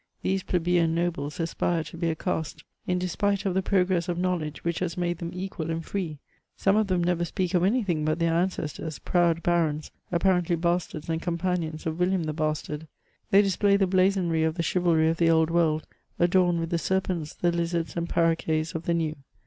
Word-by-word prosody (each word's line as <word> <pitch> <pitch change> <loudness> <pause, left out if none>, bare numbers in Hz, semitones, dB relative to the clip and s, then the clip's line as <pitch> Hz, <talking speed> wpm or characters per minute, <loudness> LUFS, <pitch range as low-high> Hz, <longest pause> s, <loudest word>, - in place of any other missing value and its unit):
These 190 +1 +1
plebeian 175 -2 +1
nobles 165 -4 -2
aspire 165 0 0
to 150 +2 -10
be 170 0 -1
a 160 - -1
caste 160 -3 -3 0.2
in 180 - +1
despite 200 +3 0
of 190 - +1
the 190 - +2
progress 185 -2 +1
of 175 - -1
knowledge 175 -4 -2
which 170 -1 -1
has 175 -2 -3
made 175 -1 -1
them 170 - -4
equal 180 -3 -5
and 165 0 -3
free. 175 -7 -3 0.4
Some 195 +1 +3
of 215 -1 +2
them 180 -2 +1
never 175 0 +1
speak 180 +1 -2
of 180 -1 +3
any 230 +6 +2
thing 170 -6 -1
but 155 +1 +1
their 165 -1 +1
ancestors, 165 -3 -2
proud 170 -2 +1
bux>ns, 160 -3 0 0.2
i^parently 175 -1 +2
bastards 170 -2 -1
and 165 0 -1
companions 170 -2 -2
of 160 - 0
^ - - -11
William 180 0 +2
the 155 -1 -2
Bastard; 155 0 -3 0.4
they 200 +1 +6
display 200 +1 +3
the 195 - +3
blazonry 185 -3 +2
of 160 0 0
the 170 - -1
chivalry 170 -2 +2
of 165 +1 +1
the 165 0 +3
Old 160 0 +3
World, 160 -2 +2 0.3
adorned 175 -1 +3
with 165 - -4
the 170 - +1
serpents, 185 -4 -1
tne 175 - +1
lizards, 170 -1 -1
and 170 0 -2
parroquets 165 -1 +1
of 165 0 -5
the 170 - +1
New. 160 -2 -1
170 Hz, 205 wpm, -26 LUFS, 160-180 Hz, 0.4 s, they